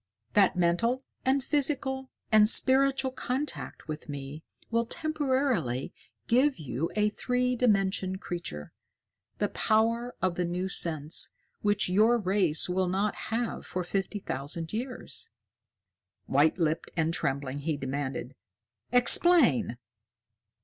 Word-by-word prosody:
"That 200 Hz, -3 st, +4 dB
mental 205 Hz, +9 st, +1 dB, 0.2 s
and 265 Hz, +1 st, +2 dB
physical 265 Hz, -2 st, 0 dB, 0.2 s
and 215 Hz, -1 st, +6 dB
spiritual 270 Hz, +1 st, +3 dB
contact 260 Hz, -, -4 dB
with 155 Hz, 0 st, -7 dB
me 140 Hz, +1 st, -6 dB, 0.3 s
will 230 Hz, 0 st, +1 dB
temporarily 260 Hz, -, -1 dB, 0.3 s
give 260 Hz, +4 st, +3 dB
you, 150 Hz, +1 st, -3 dB
a 210 Hz, 0 st, +2 dB
three 250 Hz, +3 st, -1 dB
dimension 195 Hz, -5 st, +1 dB
creature, 125 Hz, -, -6 dB, 0.7 s
the -, -, 0 dB
power 230 Hz, +3 st, +1 dB
of 185 Hz, -2 st, 0 dB
the 180 Hz, -, +1 dB
new 175 Hz, +2 st, -2 dB
sense, 155 Hz, -4 st, +1 dB, 0.3 s
which 205 Hz, 0 st, +1 dB
your 215 Hz, +6 st, +4 dB
race 190 Hz, -6 st, +2 dB
will 185 Hz, +1 st, 0 dB
not 200 Hz, +3 st, 0 dB, 0.2 s
have 230 Hz, +1 st, -2 dB
for 180 Hz, -, -3 dB
fifty 195 Hz, +3 st, -2 dB
thousand 160 Hz, 0 st, -3 dB
years." 245 Hz, -, -2 dB, 1.0 s
White 145 Hz, +5 st, +3 dB
lipped 160 Hz, -2 st, -1 dB
and 165 Hz, 0 st, +1 dB
trembling, 140 Hz, -2 st, -2 dB
he 150 Hz, +1 st, -2 dB
demanded: 135 Hz, -1 st, -4 dB, 0.6 s
"Explain!" 245 Hz, -, +4 dB
195 Hz, 115 wpm, -28 LUFS, 160-250 Hz, 1.0 s, and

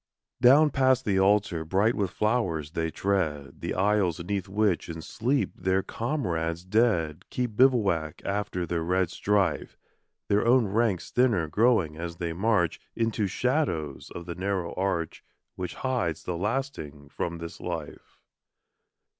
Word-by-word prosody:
Down 145 Hz, +5 st, +6 dB
past 130 Hz, -1 st, +3 dB
the 95 Hz, -2 st, +2 dB
altar, 95 Hz, -4 st, +2 dB
bright 95 Hz, +8 st, +2 dB
with 100 Hz, -5 st, -1 dB
flowers, 95 Hz, -9 st, -1 dB
they 80 Hz, 0 st, -1 dB
tread 80 Hz, -7 st, -2 dB
The -, -, -3 dB
aisles 95 Hz, -3 st, +2 dB
'neath 95 Hz, +1 st, -2 dB
which 100 Hz, -4 st, +1 dB
in 80 Hz, -1 st, -5 dB
sleep 125 Hz, +10 st, 0 dB
their 95 Hz, +1 st, 0 dB
comrades 90 Hz, -, -2 dB
dead 95 Hz, -7 st, +1 dB
Keep 125 Hz, -4 st, -2 dB
bivouac 100 Hz, -, +2 dB
after 100 Hz, -3 st, -2 dB
their 85 Hz, 0 st, -2 dB
red 90 Hz, +1 st, +1 dB
strife, 100 Hz, -1 st, 0 dB, 0.5 s
Their 100 Hz, +1 st, +2 dB
own 120 Hz, 0 st, +4 dB
ranks 105 Hz, -2 st, 0 dB
thinner 115 Hz, -10 st, +2 dB
growing 100 Hz, -5 st, +2 dB
as 85 Hz, 0 st, -5 dB
they 85 Hz, -1 st, -3 dB
march 95 Hz, -2 st, +1 dB, 0.2 s
Into 115 Hz, -2 st, 0 dB
the -, -, 0 dB
shadows 95 Hz, -, -1 dB
of 85 Hz, -, -8 dB
the 85 Hz, -, -5 dB
narrow 95 Hz, -1 st, -2 dB
arch 90 Hz, -4 st, -2 dB, 0.3 s
Which 90 Hz, -1 st, -5 dB
hides 85 Hz, -, -2 dB
the 90 Hz, -, -3 dB
lasting 90 Hz, -, -3 dB
from 85 Hz, +3 st, -3 dB
this 85 Hz, 0 st, -8 dB
life. 85 Hz, -4 st, -6 dB
95 Hz, 145 wpm, -27 LUFS, 85-115 Hz, 0.5 s, Down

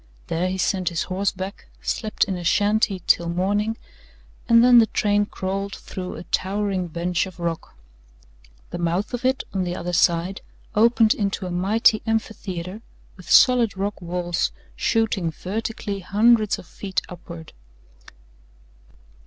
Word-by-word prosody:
There 175 Hz, +3 st, 0 dB
he 190 Hz, -, -2 dB
sent 185 Hz, -1 st, 0 dB
his 170 Hz, -2 st, -2 dB
horse 195 Hz, +1 st, -1 dB
back, 190 Hz, +2 st, -7 dB, 0.2 s
slept 215 Hz, -2 st, 0 dB
in 195 Hz, -2 st, -2 dB
a 175 Hz, -, -6 dB
shanty 205 Hz, 0 st, +2 dB
till 170 Hz, 0 st, +3 dB
morning, 205 Hz, +5 st, 0 dB, 0.7 s
and 230 Hz, 0 st, +7 dB
then 245 Hz, -1 st, +8 dB
the 225 Hz, -, +5 dB
train 205 Hz, 0 st, +1 dB
crawled 195 Hz, +1 st, -4 dB
through 185 Hz, -1 st, -7 dB
a -, -, -8 dB
towering 195 Hz, -1 st, -1 dB
bench 175 Hz, +2 st, -1 dB
of 185 Hz, -1 st, -13 dB
rock. 170 Hz, -1 st, -4 dB, 1.0 s
The -, -, -5 dB
mouth 175 Hz, +7 st, -1 dB
of 245 Hz, -, -3 dB
it 265 Hz, +1 st, +1 dB
on 190 Hz, -2 st, 0 dB
the 175 Hz, 0 st, -3 dB
other 180 Hz, 0 st, -4 dB
side 175 Hz, +2 st, +2 dB, 0.3 s
opened 225 Hz, 0 st, +4 dB
into 200 Hz, -2 st, -2 dB
a 180 Hz, -, -4 dB
mighty 210 Hz, +5 st, +3 dB
amphitheatre 205 Hz, -3 st, -3 dB, 0.3 s
with 180 Hz, -3 st, -14 dB
solid 245 Hz, -6 st, +5 dB
rock 200 Hz, +1 st, -3 dB
walls 175 Hz, 0 st, -1 dB, 0.2 s
shooting 220 Hz, -6 st, +1 dB
vertically 205 Hz, +4 st, -4 dB
hundreds 215 Hz, +3 st, +3 dB
of -, -, -11 dB
feet 195 Hz, +1 st, -4 dB
upward. 170 Hz, -2 st, -10 dB
195 Hz, 145 wpm, -23 LUFS, 180-215 Hz, 1.0 s, then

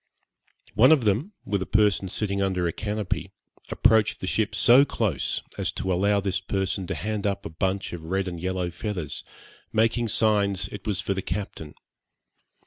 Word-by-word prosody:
One 130 Hz, +6 st, +6 dB
of 150 Hz, -6 st, +5 dB
them, 115 Hz, -, 0 dB
with 100 Hz, -1 st, -1 dB
a -, -, -3 dB
person 105 Hz, -2 st, +2 dB
sitting 100 Hz, 0 st, -2 dB
under 95 Hz, -3 st, 0 dB
a 85 Hz, -, -2 dB
canopy, 105 Hz, -2 st, -3 dB, 0.4 s
approached 110 Hz, -2 st, +3 dB
the -, -, -5 dB
ship 105 Hz, +2 st, 0 dB
so 125 Hz, +6 st, +7 dB
close, 105 Hz, -, -1 dB, 0.2 s
as -, -, 0 dB
to 95 Hz, -, -2 dB
allow 100 Hz, +3 st, +2 dB
this 95 Hz, -1 st, -1 dB
person 95 Hz, -1 st, -2 dB
to -, -, -2 dB
hand 105 Hz, 0 st, -2 dB
up 100 Hz, 0 st, -2 dB
a -, -, -4 dB
bunch 95 Hz, +5 st, -2 dB
of 85 Hz, -, -6 dB
red 95 Hz, +3 st, -1 dB
and 85 Hz, -2 st, -5 dB
yellow 90 Hz, 0 st, -2 dB
feathers, 90 Hz, -5 st, -5 dB, 0.5 s
making 115 Hz, +2 st, +2 dB
signs 100 Hz, -3 st, +3 dB
it 100 Hz, -1 st, -9 dB
was 100 Hz, -2 st, 0 dB
for 100 Hz, -, -1 dB
the 95 Hz, -, -3 dB
captain. 85 Hz, -4 st, -5 dB
100 Hz, 175 wpm, -25 LUFS, 95-105 Hz, 0.5 s, so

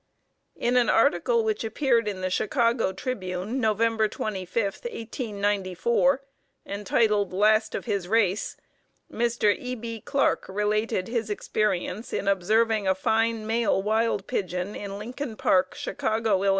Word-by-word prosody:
In 245 Hz, +1 st, +1 dB
an 240 Hz, -3 st, +3 dB
article 455 Hz, -, +3 dB
which 435 Hz, -, -1 dB
appeared 230 Hz, 0 st, +1 dB
in 195 Hz, -3 st, -3 dB
the 185 Hz, 0 st, -1 dB
Chicago 230 Hz, 0 st, +1 dB
Tribune 190 Hz, +1 st, -3 dB
Nov. 220 Hz, -4 st, +1 dB
25, 215 Hz, -3 st, 0 dB, 0.2 s
1894, 225 Hz, -, 0 dB, 0.4 s
entitled 205 Hz, 0 st, +1 dB
"Last 215 Hz, +3 st, +3 dB
of -, -, -4 dB
His 200 Hz, -6 st, -2 dB
Race," 205 Hz, -2 st, +1 dB, 0.5 s
Mr. 235 Hz, -3 st, +2 dB
E. 250 Hz, 0 st, -5 dB
B. 230 Hz, -1 st, -6 dB
Clark 280 Hz, -1 st, +1 dB
related 210 Hz, -1 st, 0 dB
his 230 Hz, -2 st, -2 dB
experience 210 Hz, 0 st, -2 dB
in -, -, -2 dB
observing 210 Hz, +2 st, +2 dB
a 190 Hz, -, +3 dB
fine 225 Hz, +2 st, +1 dB
male 225 Hz, -2 st, +1 dB
wild 220 Hz, -1 st, +1 dB
pigeon 180 Hz, +1 st, -3 dB
in 200 Hz, -1 st, -6 dB
Lincoln 245 Hz, +3 st, -6 dB
Park, 185 Hz, -3 st, +2 dB
Chicago, 220 Hz, -3 st, 0 dB
Ill. 200 Hz, -, +3 dB
215 Hz, 130 wpm, -26 LUFS, 200-235 Hz, 0.5 s, an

